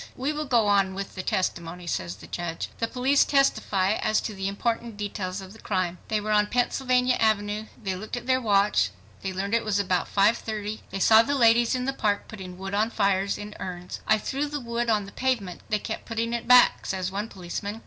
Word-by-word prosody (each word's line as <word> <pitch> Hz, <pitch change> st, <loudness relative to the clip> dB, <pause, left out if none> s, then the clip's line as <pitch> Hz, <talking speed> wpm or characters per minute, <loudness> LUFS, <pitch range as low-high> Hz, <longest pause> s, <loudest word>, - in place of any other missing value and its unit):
"We 275 Hz, +4 st, -1 dB
will 305 Hz, 0 st, -3 dB
go 240 Hz, -5 st, +3 dB
on 195 Hz, -2 st, +2 dB
with 195 Hz, 0 st, -5 dB
the 190 Hz, -, -4 dB
testimony," 180 Hz, -1 st, -2 dB
says 90 Hz, -, -3 dB
the 105 Hz, -, -13 dB
judge. 170 Hz, -2 st, -4 dB
The 230 Hz, -, 0 dB
police 260 Hz, +4 st, +3 dB
testify 210 Hz, -8 st, +2 dB
as 215 Hz, 0 st, +1 dB
to 215 Hz, -, -4 dB
the 195 Hz, -1 st, -3 dB
important 230 Hz, +2 st, -2 dB
details 200 Hz, -2 st, -4 dB
of 190 Hz, +1 st, -11 dB
the 220 Hz, -, -15 dB
crime. 185 Hz, -4 st, -2 dB
They 215 Hz, -, 0 dB
were 215 Hz, +1 st, -3 dB
on 210 Hz, 0 st, +4 dB
Pennsylvania 250 Hz, +1 st, +1 dB
Avenue—they 210 Hz, -1 st, -1 dB
looked 215 Hz, +6 st, -5 dB
at 245 Hz, -, -7 dB
their 260 Hz, 0 st, +2 dB
watch—they 105 Hz, -, 0 dB
learned 195 Hz, +3 st, -3 dB
it 230 Hz, -, +3 dB
was 215 Hz, -2 st, 0 dB
about 185 Hz, -3 st, 0 dB
5:30—they 210 Hz, -1 st, 0 dB
saw 220 Hz, +3 st, +7 dB
the 280 Hz, +5 st, -1 dB
ladies 235 Hz, -1 st, +4 dB
in 250 Hz, 0 st, -2 dB
the 270 Hz, -, 0 dB
park 205 Hz, -5 st, 0 dB
putting 185 Hz, -4 st, -9 dB
wood 195 Hz, +1 st, -6 dB
on 215 Hz, +2 st, +2 dB
fires 200 Hz, -3 st, +1 dB
in 210 Hz, 0 st, -7 dB
urns. 180 Hz, -1 st, -6 dB
"I 215 Hz, -, +5 dB
threw 275 Hz, +7 st, -2 dB
the 290 Hz, 0 st, -4 dB
wood 235 Hz, -1 st, -2 dB
on 210 Hz, -2 st, +2 dB
the 200 Hz, -, -11 dB
pavement; 230 Hz, -9 st, -1 dB
they 210 Hz, -, +2 dB
kept 220 Hz, +2 st, -5 dB
putting 230 Hz, 0 st, -2 dB
it 235 Hz, -1 st, -3 dB
back," 250 Hz, 0 st, +6 dB
says 185 Hz, -1 st, -2 dB
one 205 Hz, +3 st, -3 dB
policeman. 200 Hz, +3 st, -5 dB
210 Hz, 210 wpm, -26 LUFS, 190-235 Hz, -, saw